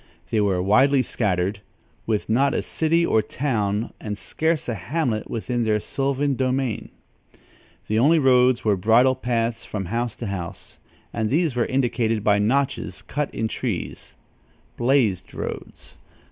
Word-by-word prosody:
They 110 -2 +2
were 95 -3 +1
widely 130 +7 +4
scattered, 100 -3 -1 0.5
with 110 -2 0
not 135 +5 +2
a - - 0
city 165 +1 +1
or 110 - +3
town 110 -3 -2
and 105 -1 -4
scarce 160 +4 -1
a 120 - -1
hamlet 120 - -2
within 120 +1 -2
their 110 -1 +2
sylvan 140 +4 -1
domain. 130 -2 -1 1.0
The 110 +1 0
only 155 +7 +5
roads 130 -4 +4
were 105 -2 +4
bridle 115 +7 +4
paths 115 -2 -1
from 100 -3 -4
house 115 +4 -2
to 120 - -6
house, 90 -4 -6 0.3
and 110 -2 -1
these 155 -1 +1
were 120 - +1
indicated 115 -4 0
by 105 -1 +3
notches 135 +6 0
cut 150 0 -3
in 110 - -2
trees - - -4 0.6
"blazed 120 -7 +1
roads." - - -7
120 Hz, 145 wpm, -23 LUFS, 105-135 Hz, 1.0 s, only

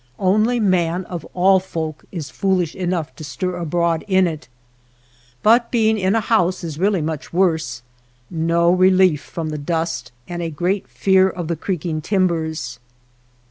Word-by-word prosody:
Only 215 +6 +2
man 180 -3 +1
of 175 -4 -6
all 190 +1 +5
folk 160 -4 -5
is 160 -5 -6
fool 190 -1 +1
ish 165 -3 -4
enough 175 -4 -2
to 155 - -8
stir 165 +7 -3
abroad 170 -1 0
in 190 -1 +4
it. 155 -7 -4 1.0
But 235 +2 +4
being 220 -2 +2
in 190 +2 +1
a - - +3
house 185 -5 +1
is 160 -3 -5
really 195 -3 +2
much 155 -1 -4
worse; 160 -9 0 0.4
no 170 +2 +2
relief 185 -3 +4
from, 160 -2 -5
the 150 -1 -4
dust, 160 -5 -2 0.2
and 175 0 -5
a 165 - -2
great 180 +6 -1
fear 190 -1 +3
of 175 -3 -5
the 170 - 0
creaking 160 -2 -3
timbers. 160 - -1
175 Hz, 160 wpm, -20 LUFS, 160-190 Hz, 1.0 s, all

